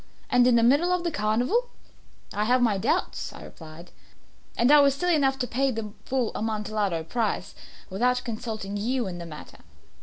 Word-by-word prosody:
And 245 0 +5
in 250 - +5
the 230 - +4
middle 290 +9 +4
of 360 -1 0
the 340 - -1
carnival!" 250 - 0 0.6
"I 210 +1 0
have 250 +3 +3
my 220 -5 +2
doubts," - - -1
I - - -11
replied; 160 +1 -12 0.7
"and 240 +4 +4
I 295 - +8
was 280 -1 +4
silly 355 +4 +1
enough 270 -3 +2
to 260 - -1
pay 270 +3 0
the 225 -4 -4
full 255 -4 -1
Amontillado 210 -5 -2
price 210 +2 -2 0.4
without 250 +6 +1
consulting 215 -3 -5
you 240 +4 -1
in 180 -2 -6
the 170 - -7
matter. 150 -2 -11
235 Hz, 180 wpm, -26 LUFS, 210-265 Hz, 0.7 s, I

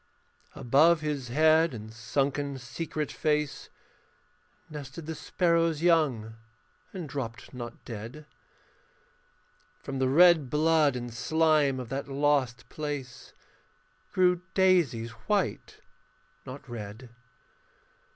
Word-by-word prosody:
Above 155 +7 +4
his 145 -4 -3
head 155 +3 +4
and 110 0 -9
sunken 140 +4 -1
secret 150 +4 -4
face 150 -2 -1 1.0
Nested 150 +1 -8
the 160 - -4
sparrow's 165 -1 +1
young 135 -11 +2 0.5
and 180 -5 -6
dropped 120 -4 -6
not 120 -2 -8
dead. 115 +7 -8 1.6
From 135 -1 -4
the 130 -1 +2
red 160 -2 +6
blood 150 -1 +3
and 120 -1 -5
slime 155 0 +2
of 125 - -7
that 135 +1 -4
lost 140 -3 0
place 145 -5 -6 0.8
Grew 180 -1 +3
daisies 170 - +3
white, 190 - -2 0.7
not 140 +3 -9
red. 115 +1 -8
145 Hz, 100 wpm, -28 LUFS, 125-160 Hz, 1.6 s, red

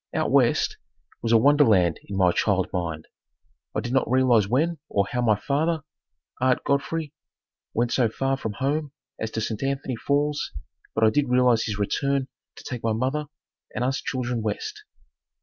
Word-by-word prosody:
"Out - - 0
West" - - +3 0.4
was 115 - -1
a 115 - +7
wonderland 110 - +4
in 100 - -5
my 90 -2 +4
child 95 0 +1
mind. 80 -3 -3 0.7
I - - +1
did 120 - -4
not 135 - +2
realize 125 -5 +4
when 155 +8 +1
or 100 -1 +1
how 125 - 0
my 110 -3 +4
father, 155 +4 0 0.6
Ard 130 -1 +2
Godfrey, 145 +2 -1 0.6
went 120 +1 +1
so 120 -4 +3
far 135 +4 0
from 110 -5 -4
home 145 +5 -2 0.3
as 110 - -2
to 110 - -3
St. 110 -1 -3
Anthony 135 -1 -2
Falls, 145 - -1 0.4
but 110 - +1
I 110 - +6
did 145 +1 +1
realize 125 -2 +4
his 105 -3 -3
return 135 +6 0 0.3
to - - -12
take 125 -3 -5
my 115 -1 0
mother 135 +6 -1 0.5
and - - -1
us 130 +2 0
children 125 -3 -2
west. 420 - -4
125 Hz, 170 wpm, -25 LUFS, 110-140 Hz, 0.7 s, a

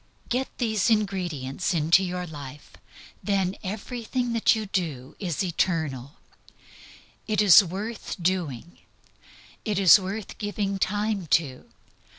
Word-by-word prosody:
Get 255 +2 0
these 220 -3 +1
ingredients 185 - -1
into 165 +4 +4
your 180 -1 -3
life. 145 -3 -10 0.5
Then 195 -2 0
everything 235 +4 -3
that 230 0 +3
you 220 -1 -3
do 160 -10 -3
is 180 -3 -2
eternal. 160 -7 -1 1.1
It 215 -1 0
is 205 0 +8
worth 200 +5 -5
doing. 170 -5 -2 0.8
It 210 -4 -1
is 195 -1 +8
worth 195 +2 -6
giving 205 -2 -2
time 205 -2 -1
to. 135 -6 -9
190 Hz, 115 wpm, -25 LUFS, 165-210 Hz, 1.1 s, is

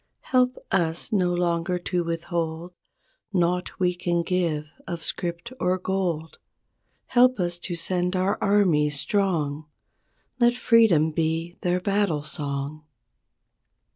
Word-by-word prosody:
Help 255 0 +3
us 170 +2 0
no 185 -4 +2
longer 175 0 0
to 175 0 -1
withhold 165 0 -3 0.6
Naught 180 -1 0
we 180 -1 +2
can 175 -1 -1
give 165 -4 -1 0.2
of 170 -3 -5
script 175 +7 -3
or 180 +1 +1
gold. 180 -4 -2 0.7
Help 250 -1 +4
us 175 -1 0
to 175 0 -4
send 180 +2 0
our 185 +2 0
armies 165 -8 +3
strong— 155 -8 0 0.7
Let 240 0 +4
Freedom 220 -11 +4
be 165 +2 -2
their 180 0 +1
battle 195 -6 0
song. 145 0 -3
175 Hz, 115 wpm, -25 LUFS, 160-190 Hz, 0.7 s, Help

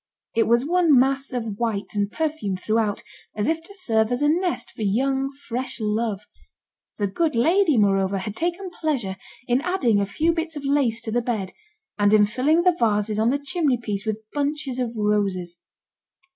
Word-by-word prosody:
It 225 -1 +3
was 235 +3 +3
one 335 -3 +4
mass 270 +1 +1
of 225 -5 -4
white, 220 -4 -2
and 205 -1 -1
perfumed 300 -12 -2
throughout, 215 0 0 0.3
as 210 0 -1
if 325 +3 0
to 395 +5 -13
serve 225 - +1
as 245 +3 0
a 295 - +4
nest 355 +3 0
for - - -10
young, 265 +6 +1
fresh 260 -3 -5
love. 215 -1 -1 0.8
The 205 - 0
good 305 - 0
lady, 325 +4 +3
moreover, 195 -2 +2
had 200 +2 -5
taken 350 - -2
pleasure 265 - -2 0.3
in 245 +2 +2
adding 290 - +1
a 200 - -1
few 320 +10 +1
bits 325 -1 -3
of 290 -1 -6
lace 270 -5 +1
to 225 -1 -5
the 240 +2 +1
bed, 220 -6 -3 0.5
and 205 0 +4
in 210 -1 +6
filling 275 +10 +2
the 360 -1 +4
vases 210 -1 +1
on 225 +2 +3
the 275 - +2
chimney 285 -2 0
piece 210 -4 -3
with 220 0 -3
bunches 285 -3 -2
of 240 -2 -2
roses. 200 -5 -1
240 Hz, 185 wpm, -23 LUFS, 210-295 Hz, 0.8 s, in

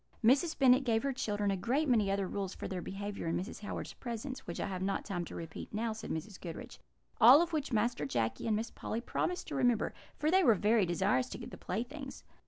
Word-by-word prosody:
"Mrs. 280 +8 +4
Bennet 260 0 +6
gave 225 -3 +1
her 275 -1 0
children 205 -5 -1
a - - +1
great 255 +11 0
many 220 -6 +3
other 195 -1 0
rules 195 0 -3
for - - -5
their 185 -2 -4
behaviour 200 0 -5
in 165 - 0
Mrs. 190 +5 -5
Howard's 205 - -5
presence, 245 +2 -6
which 170 - -5
I - - -1
have 185 -2 -4
not 195 +1 -1
time 175 -3 -3
to - - -9
repeat 165 -2 -7
now," 225 +1 -1
said 220 0 -8
Mrs. 180 +5 -5
Goodriche; 165 -3 -8 0.4
"all 250 +6 +10
of 340 0 0
which 295 -3 -1
Master 225 -8 +1
Jacky 115 - -1
and 220 - +2
Miss 225 +2 -2
Polly 225 - -4
promised 355 +8 -2
to 300 - -4
remember, 245 -4 +2 0.2
for 305 +1 +1
they 380 +1 +5
were 230 -8 +6
very 210 0 +3
desirous 195 +9 +1
to - - -6
get 235 - -8
the - - -7
playthings. 270 +8 -5
220 Hz, 230 wpm, -33 LUFS, 195-255 Hz, 0.4 s, all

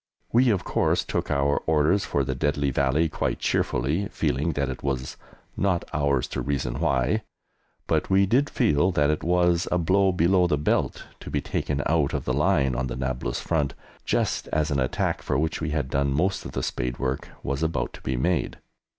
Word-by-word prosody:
We, 125 +2 +4
of 100 -5 +1
course, - - +1
took - - -3
our 70 +1 +2
orders 80 +6 +3
for 70 - 0
the 65 0 -2
deadly 70 0 0
Valley 70 +5 +2
quite 80 - -2
cheerfully, 75 +11 0
feeling 75 +6 -1
that 70 -1 -1
it 65 -1 -5
was 65 -2 -3 0.4
"not 95 -3 0
ours 70 -3 +1
to - - -3
reason 70 -4 -2
why," 65 -2 +1 0.6
but - - 0
we 95 +1 +4
did 130 +9 +2
feel 75 +5 +2
that 75 -1 +3
it 75 - -2
was 90 0 +2
a 90 - +3
blow 95 +3 +3
below 90 +1 +3
the 75 - +1
belt 75 - 0 0.2
to - - -9
be - - 0
taken 70 -1 -2
out 80 -3 +1
of - - -3
the 65 - 0
line 75 -3 +2
on 65 +2 -1
the - - -4
Nablus 65 -2 -2
front, 75 -5 -1 0.3
just - - 0
as 75 0 0
an 70 - +1
attack, 65 -1 -1
for 70 - -1
which 80 +3 -1
we 80 - -1
had 75 -4 -2
done 70 0 +1
most 90 +7 0
of - - -7
the - - -2
spade 60 -2 -2
work, 65 0 -3
was 70 +2 -2
about 80 -3 -1
to - - -11
be 65 -1 -2
made. 85 +7 0
75 Hz, 200 wpm, -25 LUFS, 65-85 Hz, 0.6 s, We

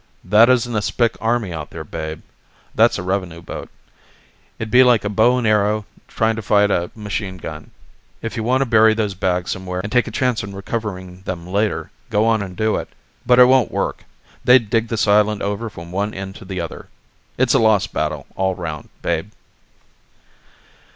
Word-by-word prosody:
"That 105 +6 +6
isn't 120 -2 +2
a - - +2
Spic 115 +3 0
army 115 -5 0
out 80 -2 -6
there, 80 - -7
Babe. 80 0 -6 0.5
That's - - +4
a - - -4
revenue 90 -3 -2
boat. - - -7 0.9
It'd 110 -1 -5
be 125 +1 +7
like 120 -4 +4
a - - 0
bow 110 +5 +3
and 125 - -1
arrow 105 0 +2 0.2
trying 110 0 0
to - - -3
fight 105 0 +3
a 85 -1 0
machine 100 -3 -4
gun. 80 -3 -8 0.5
If 115 - -5
you 115 - -2
want 125 +4 +1
to - - +2
bury 110 -2 +5
those 105 -3 -1
bags 90 -1 -1
somewhere 90 -1 -4
and 100 - -5
take 125 -1 +2
a - - -3
chance 125 -4 0
on 100 -1 -7
recovering 95 -3 -5
them 90 -2 -5
later, 95 -4 -1 0.2
go 105 -1 +2
on 115 -2 +2
and 95 -2 -7
do 110 0 +1
it. - - -5 0.4
But 125 - +5
it 125 - +9
won't 130 -1 +4
work - - -3 0.4
they'd 125 -4 +5
dig 115 0 +2
this 115 -1 0
island 105 0 +3
over 105 +3 -2
from 85 -4 -10
one 100 +3 -2
end 95 0 -6
to - - -12
the 95 -1 -5
other. 85 -1 -6 0.5
It's - - +3
a - - +4
lost 110 -4 +2
battle - - -2
all 95 -1 0
round, 80 -5 -6
Babe." 85 +3 -1
105 Hz, 195 wpm, -20 LUFS, 95-115 Hz, 0.9 s, it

